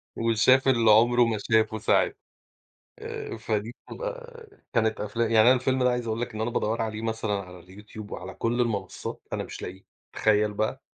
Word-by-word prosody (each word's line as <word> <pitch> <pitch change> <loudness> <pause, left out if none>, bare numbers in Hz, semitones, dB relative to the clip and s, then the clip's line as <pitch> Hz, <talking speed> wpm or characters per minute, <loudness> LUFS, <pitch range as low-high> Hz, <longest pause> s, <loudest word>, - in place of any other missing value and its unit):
وشاف 115 +4 +3
اللي 115 -4 +5
عمره 120 +3 +5
ما 110 -2 -1
شافه 110 0 +3
ساعتها. 110 - +2 0.8
آآ - - -6
فدي 110 +1 -3 0.2
بتبقى - - -7 0.3
كانت 110 -2 +1
أفلا 115 +3 -1
يعني 110 0 +4
أنا - - +8
الفيلم 130 +1 0
ده 125 - +4
عايز 125 -1 -2
أقول 110 +1 -2
لك 120 -2 -4
إن 110 - -5
أنا 115 +2 -1
بادوَّر 115 0 -1
عليه 110 0 -4
مثلًا 110 -2 -2
على 90 -3 -5
الYouTube 105 +2 -11
وعلى 95 +1 -7
كل 120 +2 -1
المنصات، 100 -6 -3
أنا - - -2
مش - - -9
لاقيه، 95 +2 -8 0.3
تخيل 105 -1 +2
بقى؟ 110 +6 -2
110 Hz, 180 wpm, -26 LUFS, 105-120 Hz, 0.8 s, أنا